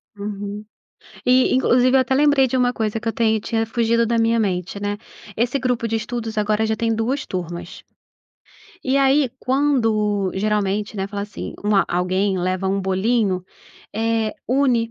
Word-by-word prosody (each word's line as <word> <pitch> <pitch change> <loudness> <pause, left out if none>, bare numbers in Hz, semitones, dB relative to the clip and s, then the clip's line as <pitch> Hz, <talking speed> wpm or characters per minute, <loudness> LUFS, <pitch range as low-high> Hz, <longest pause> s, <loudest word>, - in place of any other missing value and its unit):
Uhum. 205 0 -6 0.6
E 255 +1 +4
inclusive 255 0 +3
eu - - +5
até 260 +1 -1
lembrei 285 -1 +4
de 255 - -2
uma 250 -1 +3
coisa 220 -2 -2
que 230 - -6
eu - - 0
tenho 220 -1 +1
tinha 225 +1 -1
fugido 230 0 +1
da 230 +1 0
minha 230 0 +2
mente, 190 -2 -2
né, 205 0 -2 0.4
esse 245 +5 0
grupo 250 -2 -1
de 225 0 0
estudos 225 -1 -5
agora 210 +1 +1
já 220 0 0
tem 230 0 0
2 245 +6 -1
turmas. 175 -2 -6 1.0
E 265 +1 +1
aí, 275 -1 +3
quando 225 -8 +1
geralmente, 210 +1 -1
né, 195 0 -2
fala 200 0 -4
assim 205 - -7
uma 205 -1 +3
alguém 185 +2 0
leva 185 +1 -1
um 195 +1 0
bolinho, 190 0 0 0.5
eh, 225 0 0 0.2
une 250 -3 +2
220 Hz, 165 wpm, -21 LUFS, 200-245 Hz, 1.0 s, eu